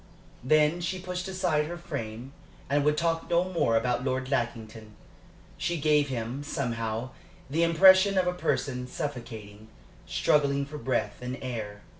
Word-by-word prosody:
Then 155 Hz, +5 st, +3 dB
she 185 Hz, +2 st, -2 dB
pushed 180 Hz, 0 st, -5 dB
aside 180 Hz, -5 st, 0 dB
her 175 Hz, +2 st, -5 dB
frame 130 Hz, -6 st, -6 dB, 0.4 s
and 145 Hz, 0 st, +3 dB
would 150 Hz, +1 st, +2 dB
talk 165 Hz, 0 st, 0 dB
no 170 Hz, +1 st, +3 dB
more 170 Hz, -11 st, +1 dB
about 125 Hz, +2 st, 0 dB
Lord 130 Hz, 0 st, -2 dB
Lackington. 110 Hz, -4 st, -3 dB, 0.6 s
She 175 Hz, -1 st, -1 dB
gave 150 Hz, -1 st, +3 dB
him, 120 Hz, +2 st, -3 dB
somehow, 120 Hz, -4 st, -3 dB, 0.4 s
the 160 Hz, +3 st, +1 dB
impression 190 Hz, +4 st, +6 dB
of 185 Hz, -, +3 dB
a 180 Hz, -, +1 dB
person 125 Hz, -7 st, -1 dB
suffocating, 110 Hz, -6 st, -6 dB, 0.4 s
struggling 140 Hz, -, +2 dB
for 150 Hz, +1 st, -8 dB
breath 130 Hz, -4 st, -1 dB
and 125 Hz, +1 st, -4 dB
air. 110 Hz, -5 st, -5 dB
140 Hz, 145 wpm, -28 LUFS, 120-170 Hz, 0.6 s, impression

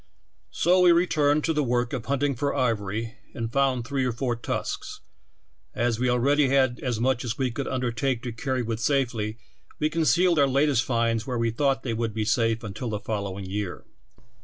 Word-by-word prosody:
So 175 Hz, -, +3 dB
we 180 Hz, -1 st, +7 dB
returned 155 Hz, -4 st, +3 dB
to 165 Hz, -, +1 dB
the 150 Hz, -, +1 dB
work 125 Hz, -1 st, 0 dB
of 125 Hz, -3 st, -3 dB
hunting 140 Hz, 0 st, +1 dB
for 140 Hz, +3 st, -1 dB
ivor^q 110 Hz, -1 st, -1 dB, 0.2 s
and 115 Hz, -1 st, -4 dB
found 135 Hz, -3 st, +1 dB
three 135 Hz, 0 st, -1 dB
or 125 Hz, -, +1 dB
four 120 Hz, +1 st, -2 dB
tusks; 115 Hz, -, -4 dB, 0.8 s
as 120 Hz, -1 st, 0 dB
we 125 Hz, -, +1 dB
alread\" 125 Hz, +4 st, +2 dB
had 130 Hz, -2 st, +2 dB
as 125 Hz, -6 st, -2 dB
much 125 Hz, +1 st, +1 dB
as 120 Hz, -1 st, -3 dB
we 130 Hz, -2 st, 0 dB
could 135 Hz, +3 st, -4 dB
undertake 125 Hz, 0 st, -1 dB
to 120 Hz, -, -3 dB
carry 130 Hz, +2 st, -2 dB
with 115 Hz, -1 st, -3 dB
safet^^ 115 Hz, -5 st, 0 dB, 0.4 s
we 150 Hz, -, +1 dB
concealed 165 Hz, +1 st, +3 dB
our 140 Hz, -, +5 dB
latest 135 Hz, -2 st, +2 dB
finds 115 Hz, -1 st, 0 dB
where 125 Hz, -2 st, -2 dB
we 115 Hz, -1 st, +1 dB
thought 135 Hz, +2 st, 0 dB
they 120 Hz, -, -2 dB
would 115 Hz, -1 st, -2 dB
be 110 Hz, -1 st, -1 dB
safe 115 Hz, 0 st, +1 dB
until 110 Hz, +3 st, -5 dB
the 105 Hz, -1 st, -2 dB
fol 105 Hz, -1 st, -3 dB
lowilig 95 Hz, 0 st, -7 dB
year. 100 Hz, -1 st, -4 dB
125 Hz, 195 wpm, -26 LUFS, 115-140 Hz, 0.8 s, we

